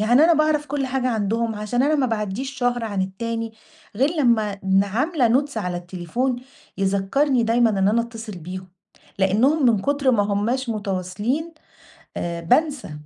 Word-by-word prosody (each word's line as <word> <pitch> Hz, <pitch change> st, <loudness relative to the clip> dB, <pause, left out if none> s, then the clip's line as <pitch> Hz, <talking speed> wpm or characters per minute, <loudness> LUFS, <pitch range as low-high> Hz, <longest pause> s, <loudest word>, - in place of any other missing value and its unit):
يعني 215 Hz, +2 st, +1 dB
أنا 340 Hz, -, +5 dB
باعرف 305 Hz, -1 st, +2 dB
كل 275 Hz, -1 st, -2 dB
حاجة 255 Hz, 0 st, -1 dB
عندهم 225 Hz, 0 st, 0 dB
عشان 210 Hz, +4 st, -1 dB
أنا 300 Hz, +2 st, +3 dB
ما 275 Hz, -4 st, +2 dB
باعدِّيش 220 Hz, +3 st, -3 dB
شهر 245 Hz, -1 st, 0 dB
عن 200 Hz, -3 st, -1 dB
التاني 225 Hz, +4 st, -4 dB, 0.4 s
غير 270 Hz, +5 st, +3 dB
لما 235 Hz, -, +1 dB
ن 195 Hz, +1 st, +3 dB
عاملة 255 Hz, -, +1 dB, 0.2 s
Notes 280 Hz, -, -13 dB
على 180 Hz, -5 st, -2 dB
التليفون 180 Hz, +9 st, -2 dB, 0.4 s
يذكَّرني 200 Hz, +8 st, +1 dB
دايمًا 230 Hz, 0 st, +3 dB
إن 195 Hz, -2 st, +2 dB
أنا 225 Hz, +3 st, +3 dB
أتصل 230 Hz, -2 st, -8 dB
بيهم، 185 Hz, +3 st, -8 dB, 0.5 s
لأنهم 245 Hz, +10 st, +3 dB
من 225 Hz, -4 st, +4 dB
كتر 280 Hz, 0 st, +2 dB
ما 215 Hz, -4 st, +3 dB
هماش 215 Hz, +6 st, -1 dB
متواصلين، 210 Hz, -, -2 dB, 0.6 s
آآ، 170 Hz, -1 st, -3 dB
بانسى. 285 Hz, -, +1 dB
230 Hz, 155 wpm, -22 LUFS, 200-265 Hz, 0.6 s, أنا